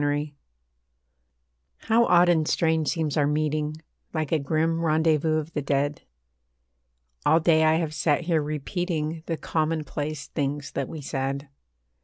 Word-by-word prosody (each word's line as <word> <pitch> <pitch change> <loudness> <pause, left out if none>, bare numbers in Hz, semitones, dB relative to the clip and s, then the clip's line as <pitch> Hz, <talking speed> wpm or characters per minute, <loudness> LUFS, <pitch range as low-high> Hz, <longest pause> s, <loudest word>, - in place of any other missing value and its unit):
MET 145 +1 0 1.5
How 230 +1 +3
odd 175 -2 +5
and 160 -3 +3
strange 160 -2 +1
seems 160 -3 -1
our 145 -1 +3
meeting 150 0 0 0.4
Like 155 -2 -1
a 160 - +3
grim 165 +3 0
rendezvous 155 0 +2
of 155 +1 -4
the 150 - -1
dead. 145 +1 -1 1.2
All 160 - +4
day 160 -1 +4
I 155 0 +4
have 160 -2 -1
sat 150 0 +1
here 165 -2 +1
repeating 155 +1 -3
The 165 - -1
commonplace 155 -2 -2
things 145 -1 -3
that - - -3
we 160 - -7
said. 140 0 -3
155 Hz, 140 wpm, -25 LUFS, 145-165 Hz, 1.5 s, odd